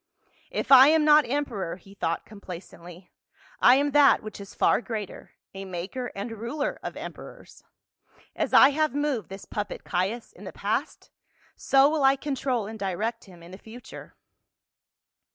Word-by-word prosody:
" - - -35
If - - -4
I 265 0 +10
am 310 0 +4
not 300 -3 +5
emperor," 240 -11 -3
he 195 +2 -17
thought 170 -4 -3
complacently, 180 -3 -12 0.3
" - - -28
I 245 - +7
am 285 +1 +1
that 290 -1 +5
which 215 -1 -8
is 200 - -12
far - - +2
greater, 220 -5 -7 0.2
a 195 0 -7
maker 190 +7 -6
and 200 +4 -5
ruler 280 +6 -3
of - - -7
emperors. - - -11 0.7
As - - -2
I 270 - +8
have 305 -1 0
moved 285 - -2
this 195 +1 -9
puppet, 210 -1 -5
Caius, 195 +6 -3
in - - -15
the - - -8
past - - -4 0.4
so 270 0 +4
will 300 -1 0
I 270 0 +5
control 270 -5 -2
and 220 +1 -8
direct 210 +5 -3
him 175 -4 -16
in 170 - -13
the 190 - -11
future." 230 +4 -12
230 Hz, 170 wpm, -26 LUFS, 195-275 Hz, 0.7 s, I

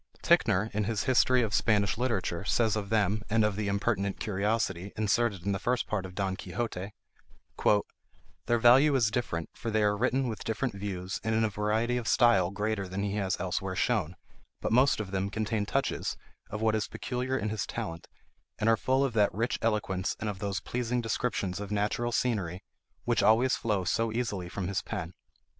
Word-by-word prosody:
Ticknor, 100 +5 +3
in 105 0 0
his 110 -1 -1
"History 130 -1 +4
of 105 -2 -2
Spanish 105 -2 +2
Literature," 105 -7 -1
says 110 +1 +2
of 100 -2 -3
them, 105 -1 +2
and 110 0 +3
of 105 -2 0
the 105 0 -2
"Impertinent 100 -1 0
Curiosity," 100 -2 -1
inserted 105 -3 +1
in 100 - +1
the 95 - -1
first 125 -1 0
part 95 -3 -2
of 90 - -13
Don 95 -1 -1
Quixote:— 95 +1 -4 1.5
"Their 120 - +3
value 130 +5 +6
is 115 -5 +3
different, 85 -10 -2
for 115 - -5
they 110 -1 +2
are 105 0 +3
written 130 +4 +1
with 110 -3 -4
different 115 +2 -2
views, 95 -2 -4
and 110 0 0
in 110 - +2
a 110 - +2
variety 110 +4 0
of 120 -2 -4
style 95 -9 +4
greater 105 0 -2
than 95 +2 -3
he 100 0 -1
has 95 -2 -1
elsewhere 95 0 -2
shown; 95 -5 0 0.4
but - - -2
most 130 +3 +4
of 100 -3 -4
them 95 0 -1
contain 110 0 -2
touches 135 +4 -1 0.3
of 110 +1 -4
what 110 -1 +3
is 110 -1 0
peculiar 125 +1 -3
in 110 -3 -2
his 110 -2 -3
talent, 85 -8 -5 0.5
and 105 - -1
are 115 0 +5
full 130 +4 +2
of 130 - -2
that 105 -2 +3
rich 115 +4 -1
eloquence 100 -4 0
and 105 -1 -2
of 95 - -10
those 100 -1 -2
pleasing 125 0 -2
descriptions 110 -5 -2
of 105 -1 -5
natural 105 +3 0
scenery 100 -7 -1 0.4
which 120 -2 +2
always 120 +4 +4
flow 105 -4 -1
so 115 +5 0
easily 105 -6 -2
from 95 0 -4
his 100 0 -1
pen. 90 -3 -5
105 Hz, 190 wpm, -29 LUFS, 100-115 Hz, 1.5 s, value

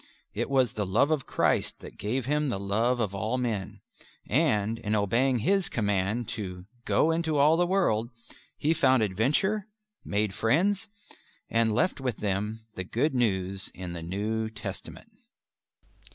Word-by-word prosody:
It 120 +5 -2
was 130 -4 +2
the 105 - -2
love 120 +11 +3
of 150 -4 0
Christ - - +1
that - - -10
gave 115 +5 -1
him 150 +1 +1
the 100 - -2
love 110 +5 +1
of 105 -4 -1
all 110 +5 -1
men, 110 -7 -3 0.5
and, 115 -6 +1
in 105 +1 -1
obeying 115 +6 +2
His 195 - +2
command 105 +1 0
to 95 -7 -5 0.2
"Go 165 - +3
into 160 -2 0
all 150 +3 +5
the 175 +1 +2
world," 120 - +1 0.5
he 155 +3 +2
found 130 -6 +4
adventure, 145 - +1 0.4
made 105 -1 0
friends, 180 - +1 0.6
and 115 -1 +3
left 180 +2 +1
with 125 -4 -2
them 105 +2 -2
the 95 - -4
Good 125 - 0
News 95 -6 0
in 90 -2 -6
the 85 - -6
New 105 +6 -2
Testament. 110 -1 -8
115 Hz, 150 wpm, -28 LUFS, 105-140 Hz, 0.6 s, all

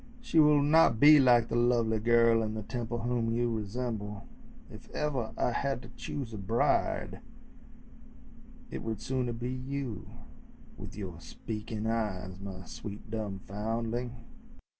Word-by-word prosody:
She 230 -9 +1
will 150 -2 +6
not 150 -6 +5
be 150 +2 +9
like 120 -3 +5
the - - -1
lovely 120 -2 +2
girl 115 0 +4
in 110 -1 -2
the 110 - -4
Temple 120 0 -4
whom 120 -1 0
you 120 0 +1
resemble. 105 -1 -4 0.5
If - - -12
ever 135 -7 -1
I - - +1
had 135 0 -1
to 120 - -11
choose 130 -6 -5
a 105 - -5
bride 105 +5 +1 1.5
it - - -4
would 110 -2 -3
sooner 125 -2 -1
be 120 +2 -4
you 130 -2 -4 0.7
with - - -9
your 90 -5 -6
speaking 110 +2 -6
eyes, 95 -5 -2
my 95 -2 -7
sweet, 105 +2 -8
dumb 105 -4 -3
foundling!" 115 +4 -3
115 Hz, 140 wpm, -30 LUFS, 110-125 Hz, 1.5 s, be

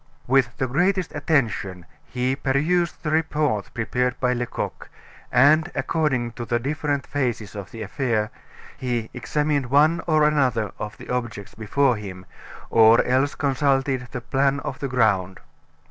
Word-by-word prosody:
With 130 -2 +2
the 130 - 0
greatest 180 +7 0
attention, 110 - -1 0.2
he 125 +1 -1
perused 155 +7 0
the 155 - -1
report 150 -8 0
prepared 125 +2 -1
by 125 -1 +2
Lecoq, 120 -1 -4 0.4
and 155 +6 +5
according 135 -7 0
to 120 - -7
the 120 +1 0
different 145 +2 -2
phases 120 -7 -2
of 100 -3 -7
the 115 -1 -7
affair, 110 0 -1 0.5
he 120 -3 -2
examined 145 +2 -1
one 155 +5 +4
or 155 -2 +3
another 130 -8 +2
of 105 0 -6
the - - -12
objects 115 -5 -4
before 120 +3 +1
him, 95 -3 -8 0.5
or 115 0 +6
else 130 +3 +1
consulted 135 -2 0
the 125 - -6
plan 135 +3 +1
of 130 - -5
the 140 - -2
ground. 105 -7 +1
130 Hz, 145 wpm, -23 LUFS, 115-145 Hz, 0.5 s, or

